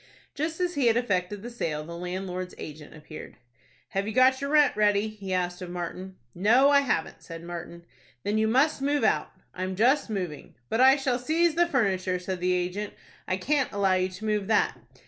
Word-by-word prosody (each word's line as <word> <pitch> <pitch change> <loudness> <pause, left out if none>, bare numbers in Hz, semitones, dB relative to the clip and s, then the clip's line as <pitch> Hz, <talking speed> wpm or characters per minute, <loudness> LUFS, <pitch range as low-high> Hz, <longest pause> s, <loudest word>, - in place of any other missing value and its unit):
Just 315 +3 -3
as 355 -1 0
he 280 -6 +1
had 230 0 +4
effected 200 -3 -1
the 240 - -7
sale, 155 -10 -3
the 170 +1 -8
landlord's 180 +1 -5
agent 150 0 -9
appeared. 155 0 -11 0.5
"Have 195 +1 -2
you 220 - -3
got 260 +1 +5
your 280 - -2
rent 300 -1 +4
ready?" 210 0 +2
he 200 -3 -8
asked 180 -1 -1
of 180 - -6
Martin. 180 +2 -6 0.2
"No, 240 +10 +4
I 285 - +6
haven't," 255 -12 -1
said 165 0 -9
Martin. 170 0 -8 0.4
"Then 210 +1 0
you 220 - +2
must 270 +6 +2
move 285 -1 +1
out." 220 - +1 0.2
"I'm 185 +1 -4
just 245 +7 +3
moving." 180 -8 -5
"But 225 - +1
I 265 +1 +8
shall 265 -3 -1
seize 320 +6 +2
the 345 +2 +3
furniture," 190 - 0
said 180 0 -4
the 180 +1 +1
agent. 180 +3 -2 0.3
"I 185 - 0
can't 275 +7 0
allow 200 -2 +2
you 185 0 +1
to 185 +4 -9
move 210 -2 0
that." 220 - +2
205 Hz, 200 wpm, -27 LUFS, 180-260 Hz, 0.5 s, I